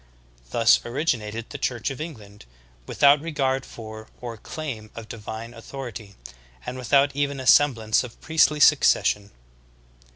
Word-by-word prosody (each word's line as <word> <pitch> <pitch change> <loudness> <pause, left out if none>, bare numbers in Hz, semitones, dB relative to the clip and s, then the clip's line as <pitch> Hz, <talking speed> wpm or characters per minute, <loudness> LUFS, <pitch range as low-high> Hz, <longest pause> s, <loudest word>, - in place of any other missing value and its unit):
Thus 115 - +4
originated 115 -4 -2
the 145 - -6
Church 120 +1 -2
of 135 - -7
England, 105 - -9 0.4
without 145 +1 +4
regard 135 -4 -1
for 110 -1 -10
or 120 -2 -6
claim 120 -4 -7
of 115 -1 -8
divine 110 +1 -7
authority, 115 -4 -9 0.5
and - - -5
without 140 +2 +2
even 140 -1 -1
a 130 - -6
semblance 120 -6 +4
of 120 -2 -11
priestly 155 -1 +2
succession. 120 -8 +4
125 Hz, 130 wpm, -24 LUFS, 110-140 Hz, 0.5 s, Thus